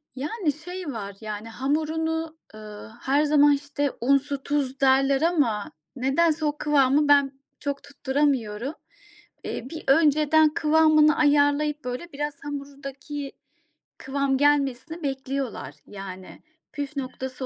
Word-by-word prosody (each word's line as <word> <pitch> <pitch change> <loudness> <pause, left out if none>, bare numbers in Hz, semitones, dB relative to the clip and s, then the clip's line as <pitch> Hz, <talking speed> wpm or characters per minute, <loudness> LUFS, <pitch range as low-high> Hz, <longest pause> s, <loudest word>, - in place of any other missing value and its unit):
Yani, 300 - -2
şey 355 +4 -8
var, 200 -3 -6
yani 215 +1 -6
hamurunu, 320 +5 -2 0.2
ııı, 215 0 -10
her 280 +3 +2
zaman 295 -1 +5
işte 285 0 -2
un, 275 +4 +5
su, 280 0 -5
tuz 275 -2 -1
derler 270 +1 +3
ama 285 -12 +1 0.2
nedense 305 +5 +1
o 295 0 -1
kıvamı 290 0 +3
ben 285 -1 +5 0.3
çok 280 -1 -4
tutturamıyorum. 270 -4 -1 0.7
Eee, 245 - -5
bir 315 0 -7
önceden 305 +1 +4
kıvamını 310 -1 +4
ayarlayıp 290 0 +2
böyle 250 +8 -5
biraz 295 +1 -3
hamurdaki 280 0 -7 0.7
kıvam 270 0 0
gelmesini 290 +2 +1
bekliyorlar. 270 -2 -4
Yani 190 -2 -9 0.3
püf 285 0 -5
noktası 260 0 -5
285 Hz, 115 wpm, -25 LUFS, 265-300 Hz, 0.7 s, zaman